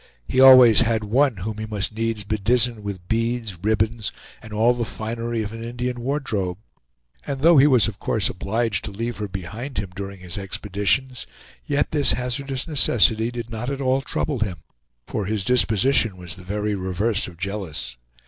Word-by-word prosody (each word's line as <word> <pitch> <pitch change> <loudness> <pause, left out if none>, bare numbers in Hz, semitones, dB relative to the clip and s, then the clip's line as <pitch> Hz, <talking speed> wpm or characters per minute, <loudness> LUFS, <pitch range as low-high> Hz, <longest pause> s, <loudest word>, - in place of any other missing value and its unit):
He 130 - 0
always 130 -4 +9
had 115 -1 +1
one 125 +3 +2
whom 105 +4 -5
he 110 - -4
must 105 -1 -2
needs 115 -1 -2
bedizen 110 +3 +1
with 100 -4 -7
beads, 115 -4 -2
ribbons, 110 +1 0 0.3
and 110 - -12
all 110 +3 +3
the 120 -1 -2
finery 115 +1 -3
of 105 +1 -6
an 115 0 -7
Indian 125 +1 -4
wardrobe; 110 -9 -2 0.7
and 135 -2 -3
though 165 -1 +6
he 140 - +7
was 125 -7 +5
of 105 -3 -6
course 110 - +1
obliged 105 +2 -1
to - - -5
leave 115 +4 -4
her 105 - -4
behind 110 +8 -6
him 100 -2 -3
during 100 0 -6
his 90 +1 -5
expeditions, 105 +6 -1 0.4
yet 145 -1 0
this 145 -2 +3
hazardous 130 +2 -3
necessity 115 -6 +3
did 120 -1 -7
not 115 +3 -4
at 140 -1 -3
all 135 0 +1
trouble 140 -1 -2
him, 90 -8 -3 0.4
for 100 -3 -3
his 105 -2 -2
disposition 120 -2 +3
was 90 -2 -5
the 95 - -12
very 105 +3 -2
reverse 95 +3 -1
of 85 - -12
jealous. 95 -9 -5
110 Hz, 175 wpm, -23 LUFS, 100-125 Hz, 0.7 s, always